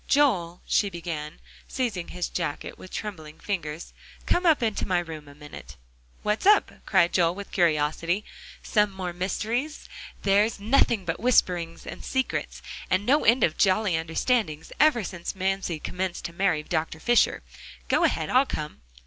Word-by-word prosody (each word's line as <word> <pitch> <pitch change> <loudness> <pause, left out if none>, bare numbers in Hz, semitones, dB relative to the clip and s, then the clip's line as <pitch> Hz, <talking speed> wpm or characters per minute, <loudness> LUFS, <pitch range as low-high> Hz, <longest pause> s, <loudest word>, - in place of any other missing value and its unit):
"Joel," 190 -13 +2
she 205 - +2
began, 165 -4 -6 0.3
seizing 225 -9 -2
his 180 -1 -3
jacket 165 -4 -4
with 185 - -12
trembling 160 -9 -6
fingers, 165 -5 -4 0.3
"come 355 0 +2
up 305 -6 +4
into 220 -2 -1
my 185 -2 +2
room 160 -4 -5
a 145 - -13
minute." 145 - -11 0.5
"What's 210 - 0
up?" 415 0 +5 0.2
cried 175 -4 +3
Joel 170 -1 +3
with 200 0 -8
curiosity; 165 +3 +1 0.4
"some 210 -1 +2
more 185 -2 -5
mysteries? 225 - -2 0.4
There's 205 +3 +3
nothing 220 -2 +2
but 165 0 -2
whisperings, 180 -8 +1
and 175 - -8
secrets, 260 -1 -2 0.3
and 185 +2 +1
no 285 +6 +3
end 240 +3 +5
of 155 - +1
jolly 195 -1 +3
understandings, 165 +1 -1
ever 295 -7 +4
since 175 0 -5
Mamsie 190 -2 -1
commenced 180 +3 -4
to 170 - -5
marry 175 -4 +1
Dr. 160 0 -2
Fisher. 240 +7 +3 0.4
Go - - +2
ahead, - - +1
I'll 260 +2 +4
come." 150 0 -5
185 Hz, 155 wpm, -26 LUFS, 165-215 Hz, 0.5 s, up